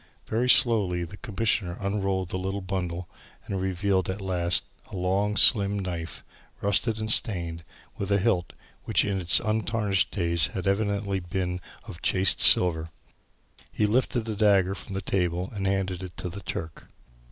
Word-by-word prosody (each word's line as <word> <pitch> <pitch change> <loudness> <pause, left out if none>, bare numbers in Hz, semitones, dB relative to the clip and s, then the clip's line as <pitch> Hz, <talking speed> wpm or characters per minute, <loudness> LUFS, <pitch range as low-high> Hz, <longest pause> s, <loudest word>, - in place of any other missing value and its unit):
Very 120 +3 0
slowly 105 -9 +4
the 85 +4 -8
Commissioner 105 -5 -1
unrolled 95 -2 -1
the 95 - -3
little 95 +2 -3
bundle 90 -2 -4 0.4
and 95 -2 -3
revealed 95 0 0
at 95 +2 -3
last 90 -6 0 0.3
a - - -7
long, 95 +3 0
slim 100 -3 +6
knife, 85 -4 -5 0.4
rusted 105 +3 +1
and 110 0 -2
stained, 85 -7 -1 0.4
with 100 - -3
a 100 - +4
hilt, 95 -3 0 0.3
which - - +3
in 100 -2 -1
its 85 0 +6
untarnished 110 -2 0
days 85 -5 0
had 95 - -4
evidently 100 0 0
been 90 0 -3 0.3
of 85 - -9
chased 95 +1 +2
silver. 80 -2 +5 0.8
He 105 - 0
lifted 120 +3 +1
the 110 -1 -5
dagger 100 -3 +3
from 100 0 -8
the 95 - -2
table 90 -1 -1
and 100 -2 -2
handed 95 -2 -1
it 90 -2 -9
to 90 - -4
the 100 +4 -7
Turk. 80 -4 -6
95 Hz, 160 wpm, -26 LUFS, 90-100 Hz, 0.8 s, slim